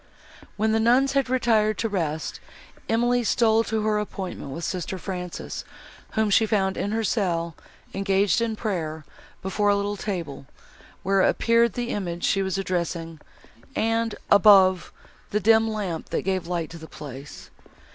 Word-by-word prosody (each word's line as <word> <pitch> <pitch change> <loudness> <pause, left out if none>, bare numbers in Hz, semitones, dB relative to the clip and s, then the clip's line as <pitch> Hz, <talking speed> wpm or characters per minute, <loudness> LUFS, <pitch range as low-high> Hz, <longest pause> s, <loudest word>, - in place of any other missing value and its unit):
When 220 +1 +1
the 220 - +2
nuns 250 +4 +4
had 275 -2 +1
retired 220 -4 +2
to 225 - 0
rest, 160 -7 -3 0.5
Emily 240 +2 +2
stole 225 0 +3
to 220 -1 -1
her 210 -1 +1
appointment 190 -7 -5
with 165 +5 -6
sister 185 +1 -3
Frances, 180 -1 -5 0.5
whom 220 -1 +1
she 220 +3 +4
found 195 -3 +1
in 205 - -2
her 225 +1 0
cell, 170 -6 0 0.4
engaged 195 +2 +2
in 230 -1 -1
prayer, 160 -8 -3 0.4
before 205 +2 +1
a 205 - +4
little 200 +1 -2
table, 170 -10 -5 0.6
where 195 0 +3
appeared 230 +2 +3
the 240 -1 -3
image 175 -4 -3
she 195 - +2
was 190 -1 -1
addressing, 170 -3 -3 0.6
and, 225 0 0 0.2
above, 195 -3 +6 0.4
the 210 - 0
dim 220 +2 +4
lamp 195 -7 -4
that - - -1
gave 190 -2 -1
light 170 -3 -3
to 165 - -9
the 160 - -10
place. 140 -2 -10
200 Hz, 155 wpm, -25 LUFS, 175-220 Hz, 0.6 s, above